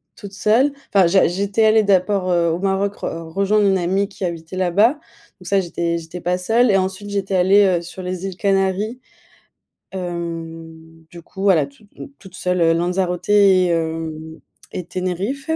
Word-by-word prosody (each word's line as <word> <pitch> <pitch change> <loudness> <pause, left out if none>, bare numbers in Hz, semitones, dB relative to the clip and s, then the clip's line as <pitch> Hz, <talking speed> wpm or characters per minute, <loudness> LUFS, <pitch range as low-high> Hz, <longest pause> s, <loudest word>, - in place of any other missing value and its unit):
toute 200 -1 -10
seule. 240 +8 +2 0.2
Enfin, 190 -4 +5
j'a 190 +2 +4
j'étais 200 +5 0
allée 220 0 +5
d'abord, 190 -1 +1
heu, 170 -1 +2
au 170 - -2
Maroc 195 +1 -1
re 165 -1 -6
rejoindre 200 +1 +2
une 190 -1 +3
amie 190 +3 0
qui 195 -2 -5
habitait 170 +1 -6
là-bas. 200 - +3
Donc 235 - -20
ça, 195 -1 +2
j'étais 170 -1 -2
j'étais 165 +2 -9
pas 180 +1 -1
seule 225 +5 +2
et 195 - +4
ensuite 190 +2 -3
j'étais 195 -1 -2
allée, 195 +3 +5 0.2
heu, - - -9
sur 175 +2 -9
les 185 +1 -5
îles 190 -2 -5
Canaries, 195 +4 0 0.9
hem, 165 -2 -7
du 170 -1 -12
coup 190 +3 -10
voilà 170 -8 +3
toute 140 +9 -21
m - - -8
toute 190 -2 -14
seule 180 -1 -1
heu, 165 0 +4
Lanzarote 180 +1 -1
et 195 -3 +5
hem 160 -1 -3 0.3
et 180 - -5
Tenerife. 185 - -4
185 Hz, 175 wpm, -20 LUFS, 170-200 Hz, 0.9 s, Enfin